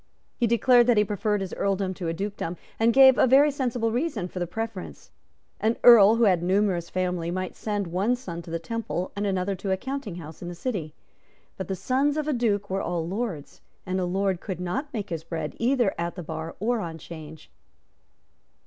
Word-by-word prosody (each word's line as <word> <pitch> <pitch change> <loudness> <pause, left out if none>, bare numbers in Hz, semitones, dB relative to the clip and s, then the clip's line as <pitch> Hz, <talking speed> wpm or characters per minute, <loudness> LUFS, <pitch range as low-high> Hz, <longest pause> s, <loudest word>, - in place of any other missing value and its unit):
He 240 - +1
declared 240 +2 +5
that 240 -3 +4
he 210 - +6
preferred 210 0 -1
his 190 - -4
Earldom 195 -1 -1
to 175 -2 -5
a 165 - -1
Dukedom, 195 -2 -4 0.2
and 225 +1 +4
gave 265 +1 +7
a - - +5
very 280 +4 +6
sensible 245 -4 -1
reason 240 - -1
for 180 - -7
the 175 - -2
preference. 220 +1 -6 0.5
An 225 +2 +1
Earl 225 -3 +9
who 235 - +2
had 185 -6 +4
a - - -5
numerous 185 -2 +1
family 180 -2 -1
might 185 +1 -3
send 205 -2 -2
one 190 +8 0
son 175 -9 -7
to 170 - -12
the 165 - -2
Temple 185 0 -4
and 205 0 -1
another 190 0 0
to 195 +2 -5
a 190 - +2
counting 265 -4 -5
house 160 -2 -10
in 175 - -6
the 175 - -6
city. 170 - -4 0.6
But 190 - -5
the 190 - -2
sons 275 - +1
of 305 -1 -1
a 300 - +1
Duke 210 -5 0
were 195 0 -2
all 170 -2 -2
lords; 190 -6 -4 0.2
and 185 0 -1
a 185 - 0
lord 190 0 0
could 190 -4 -5
not 265 - -3
make 210 - -5
his 160 -2 -3
bread 160 -2 -4
either 240 -4 +2
at 170 0 -2
the 180 - -6
bar 160 +1 -6
or 235 +3 0
on 165 -4 -5
Change. 160 -1 -11
195 Hz, 210 wpm, -26 LUFS, 175-230 Hz, 0.6 s, Earl